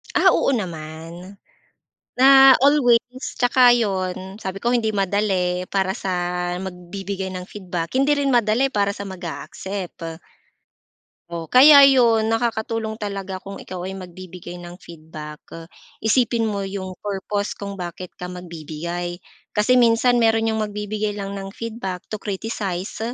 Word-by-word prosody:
Ah, - - +6
oo, 275 - +2
naman. 170 -1 -6 0.8
Na 270 +1 +8
always, 275 -4 +5 0.4
tsaka 245 -1 +5
'yon 190 -2 -2
sabi 190 0 -6
ko, 240 - +2
hindi 235 -3 +1
madali 190 -2 0
para 190 -1 0
sa 195 -2 -4 0.5
magbibigay 190 +1 -5
ng 185 -1 -5
feedback, 180 -4 -5
hindi 290 +2 +3
rin 280 -1 +1
madali 240 +3 +2
para 200 -2 0
sa 200 - -6
mag-a-accept. 180 -1 -6 1.2
O, 165 -1 -5
kaya 280 +3 +9
'yon 230 -5 +4
nakakatulong 225 -1 -1
talaga 195 -2 -4
kung 195 0 -9
ikaw 185 -1 -7
ay 190 - -6
magbibigay 180 -1 -9
ng 175 0 -10
feedback, 155 -3 -10 0.6
isipin 235 0 +2
mo 210 -2 -1
'yong 195 -1 -5
purpose 205 0 -3
kung 200 -2 -7
bakit 175 +1 -7
ka 180 - -8
magbibigay. 175 0 -6 0.4
Kasi 250 +4 +4
minsan 240 +1 +4
meron 225 0 +3
'yong 220 -1 0
magbibigay 210 0 -3
lang 200 -1 -5
ng 195 -1 -6
feedback 220 -6 -5
to 215 - -4
criticize. 195 -2 -4
200 Hz, 130 wpm, -22 LUFS, 180-225 Hz, 1.2 s, kaya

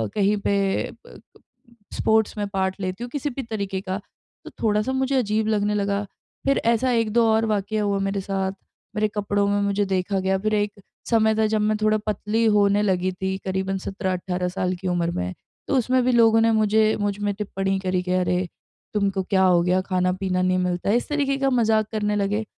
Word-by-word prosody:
कहीं 205 +1 +2
पे 200 0 0 0.5
अ, - - -13 0.8
स्पोर्ट्स 220 -1 +1
में 205 - -1
पार्ट 190 -1 -1
लेती 185 +5 -3
हूँ 245 - -5
किसी 290 +1 -2
भी 270 0 -5
तरीके 200 -4 -3
का। 190 -1 -3 0.5
तो - - -7
थोड़ा-सा 215 +3 +1
मुझे 265 +1 0
अजीब 215 -3 +1
लगने 210 -1 +1
लगा। 200 0 0 0.4
फिर 275 - +3
ऐसा 235 +2 +2
1-2 230 0 +2
और 220 +1 +2
वाक़या 210 0 -1
हुआ 200 -1 0
मेरे 195 0 -1
साथ 190 0 -2 0.4
मेरे 215 0 +2
कपड़ों 205 0 0
में 205 0 +1
मुझे 200 0 +1
देखा 190 0 -1
गया 190 0 +1
फिर 215 +2 -1
एक 205 0 0 0.4
समय 220 -2 +3
था 220 0 +2
जब 215 0 0
मैं 215 0 +1
थोड़ा 215 0 +3
पतली 215 +2 0
होने 200 0 +3
लगी 185 -2 +1
थी 190 +1 -3
करीबन 190 0 -1
17-18 185 -2 -3
साल 185 0 -2
की 185 - -3
उम्र 170 -1 0
में 90 - -3 0.3
तो 280 - 0
उसमें 255 +1 +2
भी 255 - +3
लोगों 225 -2 +5
ने 225 0 +4
मुझे 215 0 +3
मुझ 205 -1 -1
में 205 0 -1
टिप्पणी 195 -1 -2
करी 185 -1 0
कि 180 - -3
अरे 180 0 +1 0.5
तुमको 195 -2 0
क्या 190 0 +2
हो 180 -2 +4
गया 180 +1 +2
खाना-पीना 185 0 0
नहीं 185 0 +2
मिलता 180 +1 -1
है, 210 - +3
इस 245 - -3
तरीके 280 -2 0
का 275 0 +1
मज़ाक 220 -4 +2
करने 210 -1 -1
लगे 205 +2 0
205 Hz, 200 wpm, -23 LUFS, 190-220 Hz, 0.8 s, लोगों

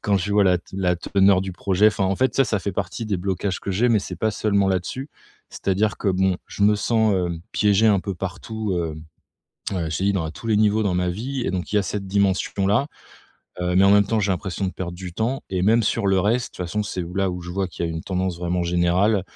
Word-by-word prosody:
Quand 100 -1 +2
je 100 +3 -2
vois 105 0 +4
la 90 -2 +4
te 90 - -16
la 90 -2 +1
teneur 95 +2 +3
du 95 - -5
projet, 100 +3 +3
enfin 100 -2 -1
en 95 0 0
fait 130 0 +1
ça, 135 - +4
ça 110 -4 0
fait 100 - -3
partie 95 +3 -3
des 100 - 0
blocages 95 0 -2
que - - -4
j'ai 115 +7 +2
mais 110 - +4
c'est 90 -2 -7
pas 110 +6 0
seulement 100 -2 +1
là-dessus, 95 - -2 0.4
c'est-à-dire 105 +2 -1
que - - -1
bon, 95 -1 +2
je 100 - -5
me 105 +1 +5
sens, 110 0 +2
hem, 85 -3 -1
piégé 105 +1 +3
un 100 -3 +3
peu 100 0 -4
partout 100 +4 -4
hem. 80 -2 -4 0.7
Heu, 85 -3 -2
je 80 - -1
te - - -2
dis 100 - +3
dans 90 -5 -1
à 80 - -5
tous 115 - -9
les 110 -2 +3
niveaux 110 +1 +3
dans 95 -3 0
ma 90 0 0
vie 125 +9 -4
et - - -1
donc 90 -1 -4
il - - +4
y - - +5
a - - -1
cette 100 +1 -4
dimension 95 0 +1
là, 115 +8 +2 0.7
heu, 90 0 0
mais 95 - +6
en 100 - +6
même 100 -1 +5
temps 110 +1 0
j'ai 100 -1 +1
l'impression 95 +1 -3
de 95 - -3
perdre 90 -1 -5
du 90 -1 -8
temps 120 +7 -2
et 90 -1 -1
même 115 +4 +4
sur 105 -1 0
le 95 -1 +3
reste, 115 +6 +1
de - - -13
toute 90 - -2
façon, 105 +5 -1
c'est 90 -3 -4
là 95 -1 +1
où 90 - -5
je 90 - -7
vois 95 +1 -2
qu'il 85 - -5
y - - -3
a 80 - -3
une 80 - -4
tendance 95 -2 -2
vraiment 90 0 -1
générale. 90 +4 +2
95 Hz, 275 wpm, -23 LUFS, 90-105 Hz, 0.7 s, mais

